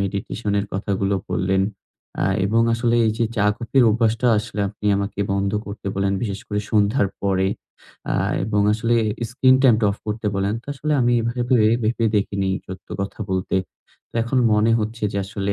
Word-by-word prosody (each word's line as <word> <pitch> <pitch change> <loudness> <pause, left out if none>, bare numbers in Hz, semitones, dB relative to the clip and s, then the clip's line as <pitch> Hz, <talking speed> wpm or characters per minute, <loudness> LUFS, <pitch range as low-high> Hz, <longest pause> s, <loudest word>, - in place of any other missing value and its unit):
Meditation 100 +2 -3
এর 100 - -5
কথাগুলো 100 0 -1 0.2
বললেন। 95 +1 +1 0.6
আ - - +2 0.2
এবং 115 +3 +2
আসলে 115 0 +1
এই 110 - +2
যে 115 - +2
চা-কফির 115 +5 +2
অভ্যাসটা, 115 +2 +1
আসলে 105 -1 -4
আপনি 105 - -7
আমাকে 100 0 -3
বন্ধ 100 0 0 0.2
করতে 100 0 -8
বললেন। 100 0 0
বিশেষ 100 -3 -3
করে 105 0 -2
সন্ধ্যার 105 +1 +2
পরে। 95 -1 +1 0.6
আ - - 0 0.3
এবং 105 0 0
আসলে 115 +2 +1 0.4
স্ক্রিন 130 +1 +4
টাইম 125 -4 +6
টা 105 - +3
অফ - - -8
করতে 105 +1 -3
বললেন। 100 +2 0
তো - - -32
আসলে 150 +3 -2
আমি 120 0 +3
এভাবে 120 +2 -2 0.4
ভেবে 115 +1 0
দেখিনি, 100 -1 0 0.2
সত্য 95 0 -10
কথা 100 +3 -5
বলতে। 95 0 -1 0.5
তো - - -34
এখন 120 +3 0
মনে 105 +2 +3
হচ্ছে 110 +1 -3
যে, 100 - -1
আসলে 100 0 -3
105 Hz, 175 wpm, -22 LUFS, 100-115 Hz, 0.6 s, টাইম